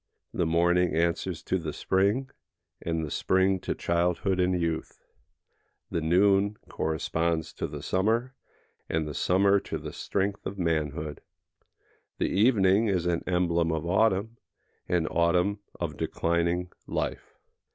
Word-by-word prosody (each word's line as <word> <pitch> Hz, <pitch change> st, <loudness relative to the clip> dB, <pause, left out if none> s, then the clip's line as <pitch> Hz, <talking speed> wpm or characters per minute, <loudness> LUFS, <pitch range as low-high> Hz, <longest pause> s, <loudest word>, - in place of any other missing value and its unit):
The 85 Hz, -, 0 dB
morning 85 Hz, +1 st, +2 dB
answers 85 Hz, +1 st, 0 dB
to 95 Hz, -, 0 dB
the 80 Hz, -3 st, -4 dB
spring, 100 Hz, +8 st, +1 dB, 0.5 s
and 80 Hz, -1 st, -2 dB
the 75 Hz, -, -7 dB
spring 95 Hz, 0 st, +2 dB
to -, -, -3 dB
childhood 90 Hz, +2 st, 0 dB
and 90 Hz, 0 st, +2 dB
youth; 85 Hz, -1 st, -3 dB, 0.9 s
the 85 Hz, -, -1 dB
noon 100 Hz, +5 st, +3 dB
corresponds 80 Hz, +1 st, -1 dB
to -, -, -3 dB
the -, -, -8 dB
summer, 115 Hz, +7 st, +1 dB, 0.6 s
and 80 Hz, -1 st, 0 dB
the 75 Hz, -, -5 dB
summer 100 Hz, +5 st, +3 dB
to -, -, -5 dB
the -, -, -7 dB
strength 100 Hz, +1 st, -2 dB
of 100 Hz, -, -6 dB
manhood. 80 Hz, -3 st, -2 dB, 1.0 s
The -, -, 0 dB
evening 105 Hz, -1 st, +4 dB
is 90 Hz, -4 st, 0 dB
an 85 Hz, -1 st, +1 dB
emblem 85 Hz, -2 st, +1 dB
of 80 Hz, 0 st, -2 dB
autumn, 105 Hz, +4 st, +1 dB, 0.5 s
and 85 Hz, -3 st, +1 dB
autumn 90 Hz, +4 st, +2 dB, 0.2 s
of -, -, -3 dB
declining 85 Hz, +1 st, 0 dB, 0.2 s
life. -, -, -3 dB
90 Hz, 130 wpm, -28 LUFS, 85-95 Hz, 1.0 s, evening